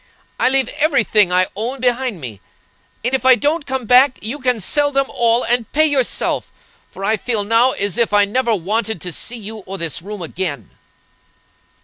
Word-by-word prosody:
I 255 - +4
leave 265 0 +2
every 290 -6 +3
thing 210 -4 +2
I 185 +1 +4
own 240 +6 -4
behind 245 -4 -1
me, 115 -8 -8 0.6
and 250 - 0
if 265 - 0
I 260 0 +7
don't 295 +4 -1
come 265 -2 -3
back, 250 +3 +5
you 235 +8 -5
can 250 -3 0
sell 290 +8 +1
them 275 -1 +1
all 235 +1 +2
and 240 -2 +1
pay 310 +1 +4
yourself, 280 -4 -1 0.4
for 195 - -7
I 220 +2 +1
feel 220 0 -2
now 230 +5 +3
as 200 +3 -2
if 235 - +2
I 205 0 +4
never 230 +2 0
wanted 215 +3 -2
to 180 - -4
see 240 +8 -4
you 220 0 -8
or 195 +1 -6
this 165 -3 -3
room 200 0 -7
again." 160 - -4
230 Hz, 195 wpm, -18 LUFS, 200-260 Hz, 0.6 s, I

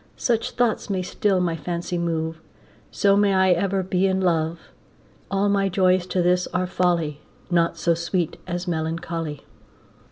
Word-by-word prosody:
Such 230 -2 0
thoughts 240 -4 0
may 190 -2 -1
still 190 +1 +1
my 175 -2 0
fancy 175 +1 -3
move, 160 -1 -2 0.5
So 200 -1 +3
may 200 -1 +3
I 190 0 +4
ever 190 +2 +1
be 185 +1 +1
in 190 0 +1
love. 165 -2 0 0.7
All 195 +1 +1
my 200 -1 +2
joys 185 -1 +2
to 180 -1 0
this 180 +1 +2
are 180 0 -1
folly, 170 -5 0 0.3
Naught 170 -1 +2
so 170 - +2
sweet 170 0 -2
as 175 +1 -3
melancholy. 160 -2 -3
180 Hz, 155 wpm, -23 LUFS, 170-190 Hz, 0.7 s, I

